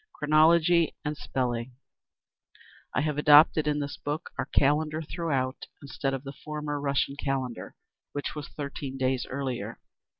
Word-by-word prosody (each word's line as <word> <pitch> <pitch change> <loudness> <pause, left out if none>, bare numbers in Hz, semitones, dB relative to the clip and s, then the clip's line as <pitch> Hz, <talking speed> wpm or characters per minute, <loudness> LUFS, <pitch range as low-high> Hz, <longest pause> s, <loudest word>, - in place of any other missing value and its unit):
Chronology 160 +2 +4
and 150 +1 -1
Spelling 125 -3 -3 1.2
I - - 0
have 150 -1 -1
adopted 150 +1 +6
in 150 0 +1
this 145 0 -4
book 145 +2 -4
our - - -3
Calendar 155 +3 +2
throughout, 140 -6 -2
instead 135 -1 -3
of 135 - -7
the 135 0 -7
former 150 -1 -4
Russian 140 -1 0
Calendar, 135 -4 -3 0.4
which 145 - -4
was 150 -2 -6
thirteen 140 -2 -6
days 130 -1 0
earlier. 130 -2 -4
145 Hz, 135 wpm, -28 LUFS, 135-150 Hz, 1.2 s, adopted